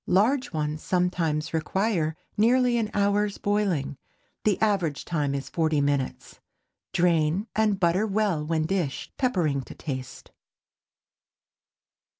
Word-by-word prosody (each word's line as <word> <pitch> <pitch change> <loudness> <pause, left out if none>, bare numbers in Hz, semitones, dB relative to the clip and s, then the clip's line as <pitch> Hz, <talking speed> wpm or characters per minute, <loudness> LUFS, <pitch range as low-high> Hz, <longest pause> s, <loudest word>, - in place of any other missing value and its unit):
Large 245 +8 +2
ones 155 -1 -2
sometimes 170 -4 0
require 165 -1 0 0.2
nearly 245 +2 +3
an 215 -2 -1
hour's 205 0 +1
boiling. 195 -10 0 0.5
The 210 -3 +2
average 190 -9 0
time 145 -5 -1
is 140 - -4
forty 160 -3 +1
minutes. 140 -2 -2 0.5
Drain 170 0 +2
and 215 -3 +2
butter 185 +4 +2
well 200 -6 0
when 155 0 0
dished, 165 -5 -2
peppering 175 - +1
to - - -11
taste. 130 -4 -7
175 Hz, 115 wpm, -26 LUFS, 155-205 Hz, 0.5 s, nearly